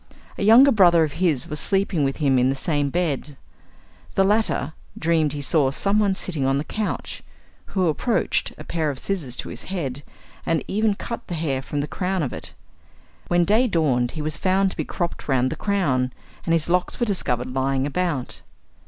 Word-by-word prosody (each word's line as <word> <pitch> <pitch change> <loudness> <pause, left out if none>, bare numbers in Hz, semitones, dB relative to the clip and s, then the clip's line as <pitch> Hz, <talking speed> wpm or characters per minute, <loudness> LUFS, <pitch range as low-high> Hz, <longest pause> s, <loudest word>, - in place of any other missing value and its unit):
A - - -7
younger 240 +7 +7
brother 175 -7 +5
of 155 - -1
his 160 -6 +1
was 150 -2 -4
sleeping 195 -5 +1
with 135 0 -1
him 135 -4 +3
in 125 +1 +3
the 135 - 0
same 145 0 0
bed. 150 -3 -2 0.8
The 195 - +4
latter 195 - +1 0.2
dreamed 160 -2 +1
he 145 - -4
saw 140 -1 +2
someone 200 +6 +1
sitting 165 -7 -3
on 135 +1 +2
the 140 - -1
couch, 215 +5 -4 0.6
who 185 - +3
approached 220 +9 0
a - - -9
pair 160 -3 -1
of 140 - -4
scissors 150 -8 -2
to - - -5
his 120 - -8
head, 145 -8 -4 0.4
and 165 -1 0
even 210 +1 +1
cut 235 +3 -6
the 175 - -3
hair 145 -5 -1
from 145 +2 -3
the 145 - -3
crown 185 0 -2
of 130 - -3
it. - - -7 0.7
When 175 0 +3
day 220 +7 +3
dawned 135 - +1
he 155 - -4
was 155 0 -1
found 190 +1 +2
to - - -10
be - - -2
cropped 175 -2 -4
round 130 -2 +2
the - - -2
crown, 140 -11 0 0.3
and 165 - +1
his 165 -2 +1
locks 180 +1 0
were 240 - +2
discovered 125 - -2
lying 135 0 0
about. 150 -3 -2
160 Hz, 195 wpm, -23 LUFS, 135-190 Hz, 0.8 s, younger